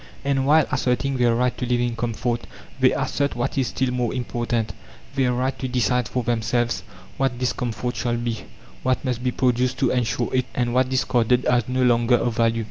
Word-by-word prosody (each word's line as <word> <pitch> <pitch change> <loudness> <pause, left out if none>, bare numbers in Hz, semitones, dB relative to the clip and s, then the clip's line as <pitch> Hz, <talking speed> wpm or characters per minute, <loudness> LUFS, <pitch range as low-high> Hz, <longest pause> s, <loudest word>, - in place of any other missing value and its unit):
And 135 -1 +1
while 155 0 +5
asserting 130 +1 0
their 120 -2 +3
right 125 +1 +1
to 125 - -1
live 120 0 +1
in 120 -1 0
comfort, 120 +1 -2 0.3
they - - +5
assert, 140 0 -1
what 120 - -2
is 130 -3 +1
still 130 0 -1
more 125 -2 -1
important, 120 -2 -2 0.4
their 130 -2 +2
right 130 +2 0
to 130 - -2
decide 125 -1 +1
for 125 0 -2
themselves 120 +1 0 0.4
what 135 -2 0
this 125 0 0
comfort 120 +1 -3
shall 120 -1 0
be, 120 -2 -3 0.4
what 130 +1 0
must 125 -2 -2
be 125 - +2
produced 125 0 +1
to - - +2
ensure 120 -1 0
it, 130 -1 +1
and 120 -1 0
what 130 0 +2
discarded 125 -1 +2
as 120 -2 +2
no 130 0 +1
longer 120 0 +4
of 120 -1 0
value. 115 0 +2
125 Hz, 200 wpm, -23 LUFS, 120-130 Hz, 0.4 s, while